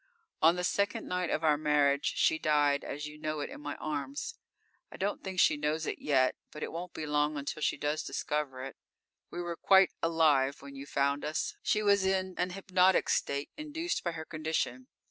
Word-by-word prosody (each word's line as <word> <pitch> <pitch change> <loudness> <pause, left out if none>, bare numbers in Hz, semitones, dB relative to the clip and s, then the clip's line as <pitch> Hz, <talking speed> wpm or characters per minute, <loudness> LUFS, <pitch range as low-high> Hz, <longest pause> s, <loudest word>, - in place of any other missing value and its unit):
_ - - -40 0.5
_On - - -4
the 180 - -2
second 200 +2 0
night 180 -1 -1
of 160 - -1
our 150 -2 +3
marriage, 145 -2 +2
she 160 - +3
died 145 -2 +2
as 145 +2 -5
you 150 0 -9
know 155 0 -3
it, 145 - -4
in - - -9
my 145 -1 -4
arms. 155 - -4 0.6
I - - -9
don't 200 +2 -2
think 190 -1 -4
she 150 - +5
knows 150 +2 -1
it - - -3
yet. 130 -3 +2 0.2
But 150 - -7
it - - -4
won't 170 +2 -6
be 160 - -4
long 150 0 +1
until 145 +2 -4
she - - +1
does 150 +1 -1
discover 140 -4 -3
it. 135 - -8 0.5
We 175 - -5
were 170 -1 -4
quite 190 +2 +5
alive 150 -5 +2
when 140 0 -10
you 140 +1 -8
found 140 +1 0
us; 155 +1 -2
she 215 - +1
was 200 -1 +4
in 190 -1 0
an 180 +1 +1
hypnotic 185 0 +2
state 140 +1 0
induced 315 +3 -3
by 170 - -1
her 160 -1 -6
condition. 160 +12 -2
155 Hz, 205 wpm, -31 LUFS, 145-180 Hz, 0.6 s, she